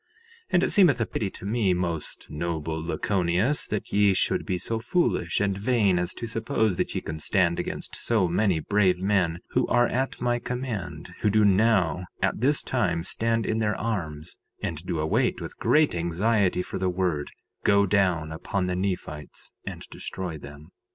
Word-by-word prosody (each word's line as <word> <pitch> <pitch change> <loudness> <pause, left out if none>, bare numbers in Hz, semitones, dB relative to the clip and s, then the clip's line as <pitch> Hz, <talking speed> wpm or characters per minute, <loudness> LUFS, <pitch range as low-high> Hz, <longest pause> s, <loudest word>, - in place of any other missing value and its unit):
3:3 - - -49
And 180 0 +4
it - - +2
seemeth 175 -11 +5
a - - +2
pity 105 - -2
unto 95 - -9
me, 105 -3 +1
most 85 -3 -3
noble 80 0 -3
Lachoneus, 90 - +1
that 105 - -4
ye 100 -1 +4
should - - +1
be 90 - 0
so 110 +5 -1
foolish 115 - 0
and 100 -1 +1
vain 100 -3 +2
as 90 +1 -2
to 120 - -5
suppose 110 -3 0
that - - -1
ye - - -1
can 80 0 -6
stand 85 0 +1
against - - -4
so 110 -6 +2
many 90 0 +2
brave 95 +1 +2
men 90 -3 +1
who - - +1
are 120 0 +3
at 130 +2 -2
my 120 0 +1
command, 125 -5 -5
who 105 - +3
do 105 +1 +4
now 95 -4 +3
at - - 0
this 140 +3 +3
time 90 -10 0
stand 115 +4 0
in 110 - 0
their 105 -1 +1
arms, 85 -8 -4 0.2
and 80 0 -4
do 85 - -1
await 80 +1 +1
with - - -8
great 155 0 +3
anxiety 90 +3 +1
for - - -5
the 95 0 +1
word—Go 90 +3 0
down 90 -5 +1
upon 90 +4 -2
the 90 0 -1
Nephites 90 -6 -4 0.2
and - - -6
destroy 90 -3 -5
them. 75 +1 -11
95 Hz, 180 wpm, -26 LUFS, 85-110 Hz, 0.2 s, seemeth